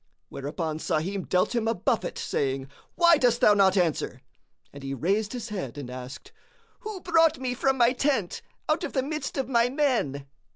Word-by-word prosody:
Whereupon 155 +3 -4
Sahim 180 +5 -2
dealt 180 +5 +2
him 230 -2 0
a 230 - +1
buffet, - - -1
saying, 135 - -2 0.3
"Why 340 -1 +6
dost 240 -3 +3
thou 210 - +6
not 195 -1 +4
answer?" 155 -7 0 0.5
And 140 - -10
he 135 0 -4
raised 200 - 0
his 240 -2 -5
head 180 - -5
and 130 -4 -6
asked, 130 +2 -9 0.5
"Who 430 -5 -7
brought 330 -3 +3
me 255 -1 -2
from 265 +1 +1
my 240 0 +4
tent 265 -8 0 0.3
out 310 +3 +1
of - - -4
the 265 - +1
midst 305 +2 -4
of 265 -3 -1
my 240 -2 +3
men?" 245 - 0
220 Hz, 180 wpm, -26 LUFS, -, 0.5 s, Why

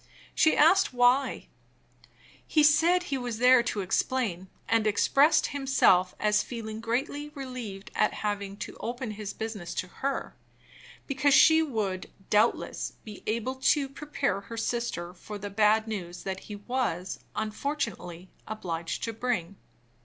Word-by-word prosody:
She 315 - +3
asked 330 0 +5
why. 250 +2 +3 1.0
He 305 - +3
said 330 +5 +4
he 275 -6 -2
was 245 -3 -4
there 250 +1 +6
to 215 -3 -2
explain; 190 -1 -1 0.2
and 225 -1 +2
expressed 295 +8 +4
himself 265 -10 +3
as 210 0 +3
feeling 220 -3 -6
greatly 270 +6 -2
relieved 250 -8 -7
at 215 - +1
having 200 -1 -3
to - - -11
open 240 0 -4
his 210 -1 -5
business 210 -6 -6
to - - -2
her, 275 +9 -4 0.7
because 275 0 +3
she 320 +1 +7
would, 215 -11 -2 0.2
doubtless, 215 +3 +1
be 210 -2 -8
best - - -17
able 230 +4 -1
to 275 +1 +2
prepare 275 -5 -2
her 230 +3 -9
sister 225 -7 -2
for 205 +3 -8
the 205 0 -6
bad 215 +2 +3
news 180 -5 -5
that 190 -1 -4
he 210 - -9
was, 205 -5 -2 0.2
unfortunately, 215 - -3 0.2
obliged 170 -6 -4
to 230 - -2
bring. 220 -6 -2
225 Hz, 140 wpm, -28 LUFS, 200-265 Hz, 1.0 s, she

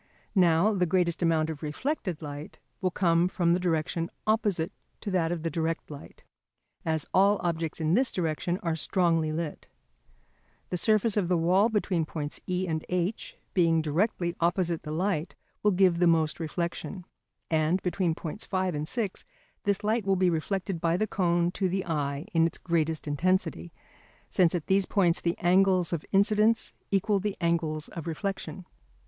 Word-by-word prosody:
Now, 180 +1 +4
the 180 -3 +1
greatest 175 0 +1
amount 160 -2 +2
of 150 - -8
reflected 170 - -3
light 145 +1 -7 0.2
will 185 - +2
come 170 -1 +2
from 175 -2 +1
the 180 - +2
direction 165 -1 -1 0.2
opposite 210 -7 +1 0.3
to 205 - -4
that 170 -3 +1
of 170 -2 -3
the 165 - -1
direct 165 -1 -2
light, 145 - -11 0.6
as 160 -2 -1
all 200 +2 +4
objects 165 -2 -2
in 160 0 +1
this 250 +5 +3
direction 175 0 -1
are 165 -2 0
strongly 165 -2 +1
lit. 155 -1 -4 1.0
The 180 - -1
surface 215 +2 +2
of 195 -4 +2
the 180 0 +2
wall 185 +6 +3
between 195 -6 0
points 150 -3 -5
E 180 +1 0
and 160 -2 -2
H, 210 - -2 0.2
being 165 -3 +3
directly 170 +3 0
opposite 170 -1 +1
the - - -8
light, 170 0 -1 0.3
will 210 - +4
give 185 -3 +3
most 165 -2 +3
reflection. 170 +3 -4 0.5
And 160 +3 +2
between 180 -2 0
points 170 +6 -5
5 185 -2 -1
and 150 +1 -3
6 215 -3 -2 0.4
this 200 0 +1
light 220 +2 +1
will 195 0 +2
be 185 -1 +3
reflected 170 +1 -2
by 170 0 +2
the 215 - +1
cone 175 -4 +1
to 190 0 -1
the 190 +1 -1
eye 145 -2 -2
in 165 -1 +4
its 165 - -4
greatest 160 -3 -1
intensity, 155 - 0 0.6
since 180 -2 +3
at 170 - -3
these 195 0 +2
points 180 -5 +2
the 170 0 -1
angles 185 0 +3
of 165 - -2
incidence 215 +3 +3 0.2
equal 200 +1 +2
the 205 0 -3
angles 165 -3 0
of 165 -2 -7
reflection. 190 +2 -4
175 Hz, 165 wpm, -28 LUFS, 160-190 Hz, 1.0 s, Now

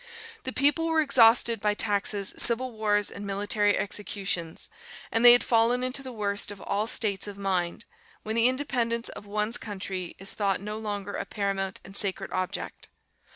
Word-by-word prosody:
"The 260 - -3
people 290 +5 +1
were 325 -1 +1
exhausted 235 -6 +3
by 210 -1 0
taxes, 205 -1 0
civil 250 +2 +9
wars, 210 -2 -1
and 200 - -9
military 205 +1 0
executions; 195 -5 -4 0.4
and 225 - 0
they 240 0 +10
had 245 - +3
fallen 235 +2 +1
into 255 +2 -3
that 260 -1 -9
worst 200 -2 -2
of 205 -1 -8
all 210 +2 -2
states 205 -4 -1
of 200 -1 -9
mind, 185 -3 -3 0.4
when 220 +1 -4
the 230 +1 +4
independence 245 -3 -2
of 205 - -11
one's 210 +3 -1
country 190 -3 -6
is 195 +1 -5
thought 200 -2 -1
no 210 +2 -6
longer 205 -2 -5
a - - -4
paramount 195 -2 -4
and 195 - -13
sacred 200 -2 -1
object. 185 0 -5
210 Hz, 170 wpm, -26 LUFS, 200-235 Hz, 0.4 s, they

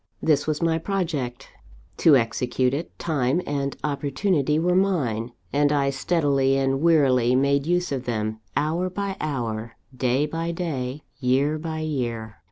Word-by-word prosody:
"This 150 -2 +2
was 155 +1 -1
my 165 -1 +2
project. 160 -10 -3 0.5
To 155 -4 +6
execute 125 +2 0
it, 155 +5 -4
time 145 -2 0
and 140 -1 -2
opportunity 145 +2 0
were 175 +3 +2
mine; 130 - +1 0.2
and 145 0 +3
I 140 -2 +2
steadily 140 -2 +1
and 135 0 +1
warily 130 -7 +4
made 140 +2 +2
use 175 -1 +1
of 130 -2 -3
them, 110 -2 -2 0.2
hour 165 +5 0
by 195 +1 -3
hour, 115 -6 -3 0.2
day 130 +3 +1
by 165 +2 -3
day, 145 -5 -3 0.2
year 140 +4 +1
by 160 0 -4
year. 120 -8 -3
140 Hz, 145 wpm, -24 LUFS, 125-160 Hz, 0.5 s, To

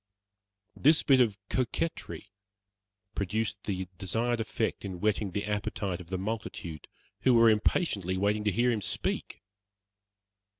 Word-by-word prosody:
This 155 +3 +4
bit 135 -2 +5
of 110 -5 +2
coquetry 130 -4 -2 0.8
produced 105 +1 -2
the 95 -2 -2
desired 115 +5 0
effect 110 0 -2
in 95 -3 -5
whetting 105 0 +1
the 100 +2 -3
appetite 100 -3 -2
of 85 - -12
the 95 +1 -2
multitude, 95 -6 -5 0.3
who 130 -2 +4
were 115 -1 +7
impatiently 105 - +1
waiting 105 +2 +1
to 105 - +3
hear 120 +5 +2
him 110 -3 -1
speak. - - -3
105 Hz, 130 wpm, -29 LUFS, 95-115 Hz, 0.8 s, were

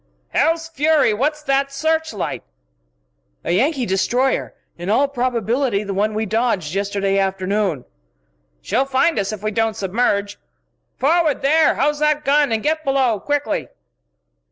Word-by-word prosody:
"Hell's 330 - +1
fury! 305 -5 +2
what's 300 +7 -1
that 275 -1 +1
searchlight?" 315 - -2 1.0
"A - - -1
Yankee 260 - +1
destroyer 245 +7 0 0.2
in 175 +2 -6
all 270 +7 +3
probability 245 -3 -1
the 200 -1 -4
one 210 +2 0
we 220 +1 -1
dodged 215 -7 -1
yesterday 195 0 0
afternoon." 195 -5 -1 0.8
"She'll 265 - +1
find 270 0 +1
us 200 0 -1
yet 215 - -4
if 205 - -20
we 215 - -1
don't 225 0 0
submerge. 205 0 -1 0.6
Forward, 310 +1 +1
there 310 +3 +4
house 295 +2 0
that 300 0 +1
gun! 285 -1 +3
And 220 -1 -1
get 315 +1 0
below 265 -6 +1
quickly!" 290 -1 -2
245 Hz, 140 wpm, -20 LUFS, 205-290 Hz, 1.0 s, there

